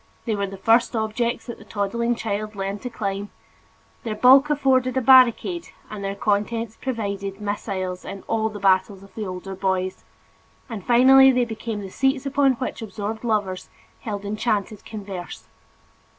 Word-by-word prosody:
They 225 -3 0
were 200 -1 -1
the 195 0 -8
first 230 +5 +3
objects 230 +2 -1
that 235 - -8
the - - -12
toddling 235 +4 -1
child 215 -1 -4
learned 195 +1 -4
to 250 - -5
climb; 205 -3 -4 0.7
their 220 -2 -4
bulk 265 +6 +6
afforded 265 -3 +2
a - - +5
barricade 260 +7 +5 0.2
and 210 -2 -6
their 195 0 -3
contents 220 +2 -1
provided 200 -6 -4
missiles 195 -3 -4
in 195 - -8
all 220 -1 0
the 210 -1 -8
battles 190 0 +2
of 195 - -17
the 215 -3 -5
older 185 +1 -6
boys; 190 -1 -2 0.6
and 225 -6 -7
finally 265 +3 +7
they 250 -1 +2
became 220 -1 -5
the 195 -2 -8
seats 270 +3 0
upon 275 -1 +3
which 255 0 -5
absorbed 215 +1 -5
lovers 205 -5 -1 0.3
held 205 -4 -5
enchanted 210 0 -2
converse. 195 -5 -7
215 Hz, 160 wpm, -23 LUFS, 200-240 Hz, 0.7 s, finally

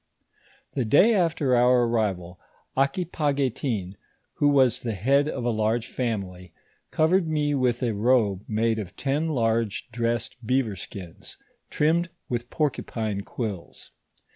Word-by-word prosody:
The 130 - 0
day 150 - +5
after 165 - +2
our 125 0 +4
arrival, 95 -7 -1 0.4
Aquipaguetin, 135 - -1 0.4
who 145 - +3
was 135 -5 +3
the 115 -2 -3
head 140 +9 +2
of 125 - -4
a 120 - +2
large 110 +1 0
family, 95 -9 -4 0.4
covered 165 +3 +2
me 150 -2 0
witli 125 -2 +1
a - - -1
robe 105 -3 +2
made 110 +1 0
of 95 -4 -7
ten 145 +4 0
large 115 -6 -1
dressed 120 0 -2
beaver 120 -3 0
skins, 90 -2 -9 0.3
trimmed 170 +4 +1 0.2
with 120 0 -3
porcupine 115 -8 -2
quills. 100 -4 -6
120 Hz, 125 wpm, -25 LUFS, 110-140 Hz, 0.4 s, day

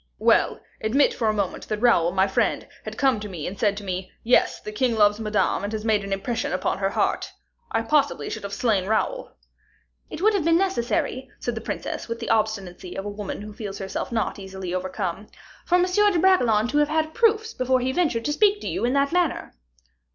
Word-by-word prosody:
"Well; - - +3 0.2
admit 260 +7 +3
for 225 - -1
a - - +4
moment 200 -3 -3
that 215 - -2
Raoul, 210 -8 +4
my 190 +1 +3
friend, 195 - 0 0.2
had - - -6
come 265 -6 +2
and 185 -1 -6
said 205 -2 +2
to 205 - -6
me, 185 -1 -4
'Yes, 245 +2 +3
the 210 - -7
king 235 +2 0
loves 210 0 +4
Madame, 215 -2 0
and 205 - -3
has 215 0 -4
made 215 -2 +2
an 195 - -6
impression 210 +5 -2
upon 185 - -1
her 195 0 +1
heart,' - - -1 0.4
I 225 - 0
possibly 225 - +1
should - - -5
have 200 - -6
slain 200 -3 +1
Raoul." - - -1 0.7
"It - - -7
would 430 +4 +4
have 395 -5 +1
been 330 +1 +4
necessary," 285 -6 -1
said 240 - -2
the 225 - -5
princess, - - -4
with 230 0 -4
the 230 - -2
obstinacy 200 -5 -1
of 195 - -4
a - - -3
woman 205 0 -6
who 210 0 -8
feels 205 -3 -6
herself 195 +4 -4
not 225 -3 -1
easily 190 -2 -6
overcome, 185 +1 -3 0.4
"for 355 - +3
M. 360 - +4
de 405 +1 +3
Bragelonne 245 - +4
to 290 +3 +2
have 295 0 +2
had 315 0 0
proofs 445 -1 +2
before 255 0 +1
he 255 +1 0
ventured 260 -8 0
to 295 - 0
speak 410 +4 +3
to - - -5
you - - -2
in 245 +2 +2
that 280 0 +2
manner." 355 -4 0
225 Hz, 215 wpm, -24 LUFS, 200-290 Hz, 0.7 s, a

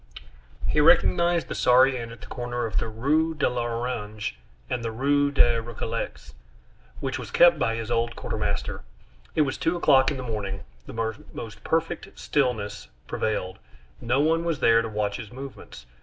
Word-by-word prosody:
He - - +2
recognized 170 - +4
the - - -4
sorry 130 +2 +5
inn 115 -2 -5
at 115 -2 -12
the - - -9
corner 120 -1 -3
of 110 - -3
the - - -2
Rue 150 +9 +1
de 150 - +2
l'Orangerie 120 - -3 0.3
and 120 - -2
the 115 - -1
Rue 140 +4 +2
des 120 -5 +3
Récollets, 115 -1 -5 0.7
which - - -2
was - - -7
kept 170 -2 +6
by 115 -4 +1
his 115 0 -4
old 115 0 0
quartermaster. - - -3 0.5
It - - +4
was 135 -3 0
two 175 +2 +1
o'clock 135 -5 +5
in 145 - -3
the 130 - -5
morning, 100 -4 -4 0.2
the 110 -1 -2 0.2
most 110 -2 -8
perfect 165 +1 -2
stillness 110 -8 -1 0.2
prevailed, 95 -4 -2 0.4
no 120 +4 +1
one 165 +3 +2
was 165 -4 -1
there 115 0 +5
to 115 - -4
watch 105 -1 -1
his 110 - -8
movements. 130 - -10
120 Hz, 170 wpm, -26 LUFS, 110-140 Hz, 0.7 s, kept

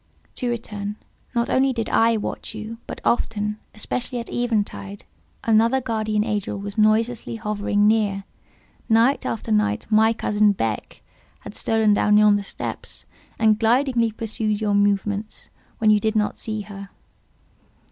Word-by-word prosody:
To 250 - -2
return. 210 -3 -4 0.4
Not 235 0 +1
only 265 0 +3
did 230 -3 -2
I 230 0 +3
watch 215 - -5
you; 220 +2 -7
but - - -6
often—especially 220 +2 -2
at 235 - -7
eventide—another 225 +1 -1
guardian 215 -4 -1
angel 210 -3 -2
was 200 0 -5
noiselessly 225 +2 +1
hovering 205 -1 0
near: 210 -3 +2 0.7
night 230 +5 +3
after 225 - -3
night 105 -1 +1
my 220 +1 +5
cousin 210 -2 +2
Beck 115 - -4 0.4
has - - -10
stolen 220 -2 +2
down 210 0 +4
yonder 210 -1 +5
steps, 200 - -5 0.3
and 220 -1 +3
glidingly 235 0 +2
pursued 215 -1 -2
your 210 -2 0
movements 205 +1 0 0.3
when 215 -1 +4
you 210 - +5
did 220 +1 -1
not 210 -1 +1
see 215 -1 -4
her." 200 -1 -9
215 Hz, 135 wpm, -23 LUFS, 205-230 Hz, 0.7 s, my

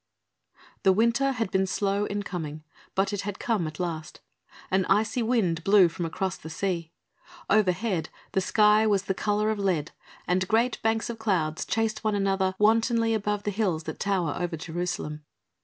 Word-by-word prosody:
The 190 - +5
winter 235 +6 +2
had 225 -5 -2
been 190 0 +2
slow 200 +1 0
in 205 0 -3
coming, 155 -5 -5 0.3
but 195 +1 +1
it 200 - -1
had 205 -1 -5
come 210 -9 0
at 155 -1 -8
last. 165 -3 -4 0.5
An 190 0 +3
icy 215 +4 +2
wind 210 -9 +1
blew 195 -2 +6
from 165 +1 -4
across 190 +3 -3
the 160 - -10
sea. 170 -1 -2 0.6
Overhead 190 -3 +2 0.2
the 190 - +1
sky 210 +2 +4
was 200 -2 +2
the 195 - -1
colour 210 +2 0
of 215 - -3
lead 175 -7 0 0.4
and 185 +1 +1
great 230 +4 +1
banks 225 +1 0
of 225 - -9
clouds 180 -7 0
chased 225 0 -1
one 215 -1 +1
another 195 -1 +1
wantonly 225 +2 +3
above 210 -1 -1
the 205 - -1
hills 185 -6 0
that - - -6
tower 180 -7 0
over 175 -2 -2
Jerusalem. 165 -2 -4
195 Hz, 175 wpm, -27 LUFS, 175-215 Hz, 0.6 s, blew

